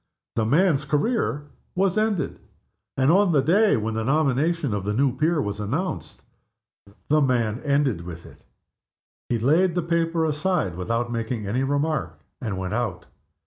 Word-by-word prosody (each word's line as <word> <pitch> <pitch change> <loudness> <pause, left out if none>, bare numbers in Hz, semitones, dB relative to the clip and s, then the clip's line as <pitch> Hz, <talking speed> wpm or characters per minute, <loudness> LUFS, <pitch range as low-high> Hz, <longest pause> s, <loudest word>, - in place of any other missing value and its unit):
The 110 -1 +1
man's 150 +2 +3
career 145 - -1 0.2
was 190 0 +2
ended; 215 -4 0 0.6
and 135 +3 +4
on 190 -1 +4
the 140 - +4
day 200 - +4
when 110 +1 -2
the 110 0 -2
nomination 150 +1 +1
of 100 -2 -2
the 105 +1 -2
new 135 +1 +2
peer 155 +4 +1
was 100 -6 -3
announced, 145 - -3 0.9
the 155 +1 +4
man 120 -4 +1
ended 140 - +1
with 85 -1 -9
it. - - -16 0.9
He 120 - +1
laid 160 +10 +2
the 175 - +1
newspaper 165 0 0
aside 155 - 0
without 115 +6 -2
making 115 -1 -3
any 115 +6 -1
remark, 145 +3 -1 0.2
and 105 -6 -3
went 95 +1 -3
out. 110 -7 -2
140 Hz, 155 wpm, -24 LUFS, 115-165 Hz, 0.9 s, and